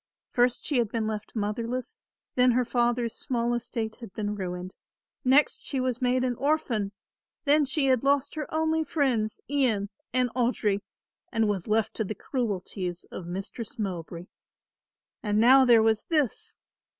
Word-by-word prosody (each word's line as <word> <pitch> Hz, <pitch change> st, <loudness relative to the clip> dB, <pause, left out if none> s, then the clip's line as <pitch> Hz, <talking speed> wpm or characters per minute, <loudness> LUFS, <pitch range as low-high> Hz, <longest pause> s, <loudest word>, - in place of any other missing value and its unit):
First 245 Hz, 0 st, +2 dB
she 280 Hz, -5 st, +1 dB
had 230 Hz, -3 st, +1 dB
been 225 Hz, 0 st, -1 dB
left 215 Hz, 0 st, -4 dB
motherless, 235 Hz, -, -3 dB, 0.3 s
then 250 Hz, -1 st, +4 dB
her 250 Hz, +1 st, +2 dB
father's 240 Hz, -1 st, +1 dB
small 240 Hz, -3 st, -1 dB
estate 225 Hz, -2 st, -3 dB
had 230 Hz, -5 st, -10 dB
been 210 Hz, -1 st, -2 dB
ruined. 180 Hz, -2 st, -5 dB, 0.5 s
Next 270 Hz, +3 st, +4 dB
she 270 Hz, -, -2 dB
was 255 Hz, -1 st, -1 dB
made 250 Hz, 0 st, +2 dB
an 255 Hz, -1 st, +1 dB
orphan. 260 Hz, -9 st, 0 dB, 0.5 s
Then 295 Hz, +1 st, +4 dB
she 275 Hz, +1 st, +1 dB
had 260 Hz, -2 st, +3 dB
lost 280 Hz, 0 st, +2 dB
her 305 Hz, -2 st, -5 dB
only 320 Hz, 0 st, +1 dB
friends 260 Hz, -8 st, 0 dB
Ian 245 Hz, -8 st, +1 dB, 0.2 s
and 250 Hz, -1 st, +1 dB
Audry 235 Hz, -5 st, +1 dB, 0.5 s
and 225 Hz, -2 st, +2 dB
was 195 Hz, -4 st, -1 dB
left 220 Hz, 0 st, +1 dB
to 220 Hz, -, +1 dB
the 215 Hz, +1 st, -4 dB
cruelties 190 Hz, -7 st, -3 dB
of 175 Hz, -, -7 dB
Mistress 205 Hz, +8 st, -6 dB
Mowbray. 175 Hz, -4 st, -4 dB, 1.0 s
And 210 Hz, -1 st, +1 dB
now 260 Hz, +4 st, +7 dB
there 235 Hz, -3 st, +6 dB
was 220 Hz, -1 st, +3 dB
this. 335 Hz, -, -1 dB
240 Hz, 155 wpm, -27 LUFS, 210-265 Hz, 1.0 s, now